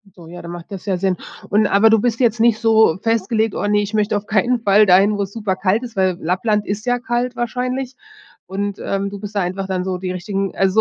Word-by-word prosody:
So, 170 Hz, -3 st, -13 dB
ja, 175 Hz, +1 st, -9 dB
dann 170 Hz, -, -8 dB
macht 175 Hz, +3 st, -10 dB
das 195 Hz, 0 st, -7 dB
ja 190 Hz, -3 st, 0 dB
Sinn. 190 Hz, 0 st, 0 dB, 0.3 s
Und 210 Hz, +1 st, +3 dB
aber 205 Hz, +3 st, +4 dB
du 225 Hz, -1 st, +4 dB
bist 235 Hz, +1 st, -1 dB
jetzt 235 Hz, -2 st, +2 dB
nicht 225 Hz, -1 st, +3 dB
so 220 Hz, -6 st, +4 dB
festgelegt: 225 Hz, -1 st, 0 dB
„Oh -, -, -2 dB
ne, 205 Hz, 0 st, +2 dB
ich 205 Hz, +1 st, -5 dB
möchte 210 Hz, -1 st, +1 dB
auf 205 Hz, -, -6 dB
keinen 230 Hz, +4 st, +1 dB
Fall 210 Hz, -1 st, +4 dB
dahin, 195 Hz, +3 st, +4 dB
wo 200 Hz, -, 0 dB
es 195 Hz, -, -7 dB
super 210 Hz, -4 st, -2 dB
kalt 190 Hz, +5 st, 0 dB
ist.“ 235 Hz, -3 st, -8 dB
Weil 185 Hz, -2 st, +1 dB
Lappland 205 Hz, +5 st, 0 dB
ist 205 Hz, +3 st, -4 dB
ja 245 Hz, 0 st, +1 dB
kalt 245 Hz, 0 st, -2 dB
wahrscheinlich 250 Hz, +2 st, -3 dB, 0.5 s
und, 200 Hz, +1 st, -4 dB
ähm, 195 Hz, 0 st, -2 dB
du 200 Hz, 0 st, -8 dB
bist 205 Hz, 0 st, -8 dB
da 200 Hz, -, +1 dB
einfach 190 Hz, +2 st, -3 dB
dann 185 Hz, -1 st, -2 dB
so 185 Hz, -1 st, -2 dB
die 180 Hz, 0 st, -4 dB
richtigen 195 Hz, +1 st, -3 dB
also, 195 Hz, 0 st, +1 dB
205 Hz, 250 wpm, -19 LUFS, 190-225 Hz, 0.5 s, aber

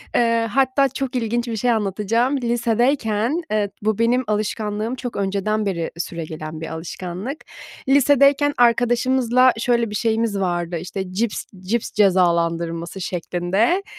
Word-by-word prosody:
Eee, 230 Hz, -1 st, +2 dB
hatta 270 Hz, +1 st, +3 dB
çok 270 Hz, 0 st, -4 dB
ilginç 240 Hz, 0 st, -1 dB
bir 230 Hz, -, -3 dB
şey 245 Hz, +3 st, +1 dB
anlatacağım, 220 Hz, +5 st, 0 dB
lisedeyken 240 Hz, +2 st, 0 dB
Eee, 210 Hz, -2 st, +1 dB
bu 215 Hz, +1 st, 0 dB
benim 245 Hz, +3 st, +2 dB
alışkanlığım 215 Hz, +2 st, -2 dB
çok 245 Hz, -2 st, -6 dB
önceden 200 Hz, +2 st, -1 dB
beri 170 Hz, -4 st, -2 dB
süregelen 160 Hz, -2 st, -6 dB
bir 160 Hz, -, -4 dB
alışkanlık. 180 Hz, -, -6 dB, 0.4 s
Lisedeyken 280 Hz, +1 st, +4 dB
arkadaşımızla 245 Hz, +1 st, +3 dB
şöyle 235 Hz, -1 st, +1 dB
bir 210 Hz, -, -5 dB
şeyimiz 225 Hz, -2 st, 0 dB
vardı, 175 Hz, -2 st, -1 dB
işte, 185 Hz, +2 st, -6 dB
cips 220 Hz, +2 st, -1 dB, 0.2 s
cips 215 Hz, +5 st, -2 dB
cezalandırması 170 Hz, -2 st, +1 dB
şeklinde. 185 Hz, -, 0 dB
220 Hz, 125 wpm, -21 LUFS, 185-245 Hz, 0.4 s, Lisedeyken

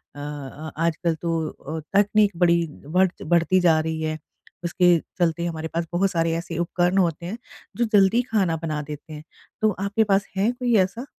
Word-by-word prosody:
अ -, -, -9 dB
अ, 145 Hz, +1 st, -7 dB
आजकल 170 Hz, +1 st, 0 dB
तो 165 Hz, 0 st, -2 dB
अ, 160 Hz, +2 st, -7 dB, 0.2 s
तकनीक 205 Hz, 0 st, +4 dB
बड़ी 170 Hz, -1 st, +3 dB, 0.2 s
बढ़ 185 Hz, +4 st, +3 dB
बढ़ती 170 Hz, +2 st, +3 dB
जा 165 Hz, -3 st, +4 dB
रही 160 Hz, 0 st, -2 dB
है, 155 Hz, 0 st, -2 dB, 0.5 s
उसके 175 Hz, 0 st, +4 dB, 0.2 s
चलते 170 Hz, -1 st, +1 dB
हमारे 160 Hz, -1 st, -3 dB
पास 165 Hz, 0 st, -1 dB
बहुत 190 Hz, +2 st, +2 dB
सारे 165 Hz, -1 st, +1 dB
ऐसे 170 Hz, -1 st, -5 dB
उपकरण 175 Hz, +2 st, +1 dB
होते 170 Hz, -3 st, +1 dB
हैं, 205 Hz, +7 st, -5 dB, 0.4 s
जो 235 Hz, -, +2 dB
जल्दी 200 Hz, +4 st, +5 dB
खाना 190 Hz, -7 st, +2 dB
बना 155 Hz, -2 st, -2 dB
देते 150 Hz, +1 st, -9 dB
हैं। 150 Hz, 0 st, -8 dB, 0.4 s
तो 215 Hz, -, +4 dB
आपके 205 Hz, +3 st, +1 dB
पास 200 Hz, -1 st, +1 dB
है 210 Hz, +5 st, +2 dB
कोई 245 Hz, -1 st, 0 dB
ऐसा? 230 Hz, +7 st, -8 dB
170 Hz, 180 wpm, -24 LUFS, 160-195 Hz, 0.5 s, जल्दी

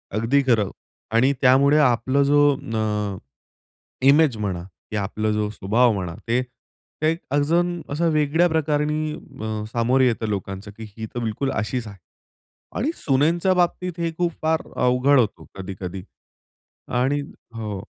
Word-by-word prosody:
अगदी 115 Hz, +6 st, +2 dB
खरं 110 Hz, -6 st, +3 dB, 0.5 s
आणि 130 Hz, +4 st, +4 dB
त्यामुळे 140 Hz, +3 st, +5 dB
आपला 130 Hz, 0 st, +2 dB
जो 145 Hz, +1 st, +3 dB, 0.2 s
न 105 Hz, -3 st, -2 dB, 0.9 s
इमेज 140 Hz, -4 st, +5 dB
म्हणा, 95 Hz, -5 st, -3 dB, 0.3 s
की -, -, -3 dB
आपला 105 Hz, +2 st, -1 dB
जो 105 Hz, 0 st, 0 dB
स्वभाव 110 Hz, +4 st, +2 dB
म्हणा 90 Hz, -4 st, -4 dB
ते 125 Hz, +2 st, +1 dB, 0.9 s
अजून 170 Hz, +4 st, +1 dB
असं 165 Hz, +3 st, +1 dB
वेगळ्या 155 Hz, +3 st, +3 dB
प्रकाराने 150 Hz, 0 st, 0 dB
अ, 110 Hz, -6 st, -6 dB
सामोरे 125 Hz, +3 st, +3 dB
येतं 115 Hz, -2 st, -1 dB
लोकांचं 100 Hz, 0 st, -4 dB
की 110 Hz, -, -8 dB
ही 110 Hz, -, -4 dB
तर -, -, -1 dB
बिलकुल 115 Hz, +5 st, -2 dB
अशीच 110 Hz, +1 st, -2 dB
आहे. 100 Hz, -2 st, -10 dB, 0.8 s
आणि 280 Hz, +9 st, 0 dB
सुनेंच्या 165 Hz, +7 st, +2 dB
बाबतीत 180 Hz, 0 st, 0 dB
हे 165 Hz, -1 st, -1 dB
खूप 175 Hz, -1 st, +1 dB
फार 160 Hz, 0 st, +1 dB
अवघड 125 Hz, +3 st, +3 dB
होतो 110 Hz, -4 st, -1 dB
कधी-कधी. 95 Hz, -1 st, -6 dB, 0.8 s
आणि 135 Hz, +4 st, 0 dB, 0.3 s
हो. 105 Hz, -4 st, -4 dB
125 Hz, 135 wpm, -23 LUFS, 105-150 Hz, 0.9 s, त्यामुळे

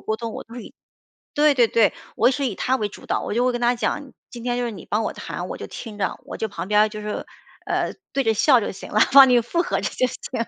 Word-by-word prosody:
沟 220 Hz, -, -2 dB
通 230 Hz, -1 st, -5 dB
我 -, -, -6 dB
都 230 Hz, +2 st, -13 dB
以 240 Hz, -, -10 dB, 0.6 s
对 295 Hz, 0 st, +4 dB
对 245 Hz, -4 st, +4 dB
对， 225 Hz, -1 st, +3 dB, 0.2 s
我 240 Hz, +4 st, +4 dB
是 275 Hz, +1 st, -1 dB
以 205 Hz, -, -4 dB
她 260 Hz, +1 st, 0 dB
为 210 Hz, -4 st, -1 dB
主 205 Hz, -, -13 dB
导。 -, -, -1 dB
我 -, -, -4 dB
就 245 Hz, +2 st, +2 dB
会 255 Hz, -, +3 dB
跟 240 Hz, -, -3 dB
她 240 Hz, +1 st, +2 dB
讲： 265 Hz, +3 st, -3 dB, 0.2 s
“今 240 Hz, -, -8 dB
天 245 Hz, -1 st, 0 dB
就 245 Hz, -, -1 dB
是 235 Hz, -, -2 dB
你 190 Hz, -, -10 dB
帮 215 Hz, +2 st, +1 dB
我 -, -, -2 dB
谈， -, -, -6 dB
我 -, -, -5 dB
就 -, -, -7 dB
听 215 Hz, -3 st, -8 dB
着”， 195 Hz, -, -2 dB
我 -, -, -8 dB
就 220 Hz, -, -2 dB
旁 185 Hz, -2 st, -6 dB
边 210 Hz, 0 st, +4 dB
儿 215 Hz, -, +3 dB
就 215 Hz, 0 st, -7 dB
是， 210 Hz, 0 st, -4 dB, 0.4 s
呃， -, -, -1 dB, 0.2 s
对 275 Hz, -, +1 dB
着 225 Hz, -1 st, +2 dB
笑 255 Hz, +3 st, +5 dB
就 -, -, -3 dB
行 195 Hz, -, -10 dB
了， 215 Hz, -, +3 dB
帮 270 Hz, -1 st, +9 dB
你 245 Hz, -, +5 dB
附 340 Hz, +9 st, 0 dB
和 -, -, -1 dB
着 -, -, -1 dB
就 255 Hz, -, +1 dB
行 -, -, -6 dB
了。 230 Hz, -, -1 dB
235 Hz, 315 characters per minute, -23 LUFS, 215-255 Hz, 0.6 s, 帮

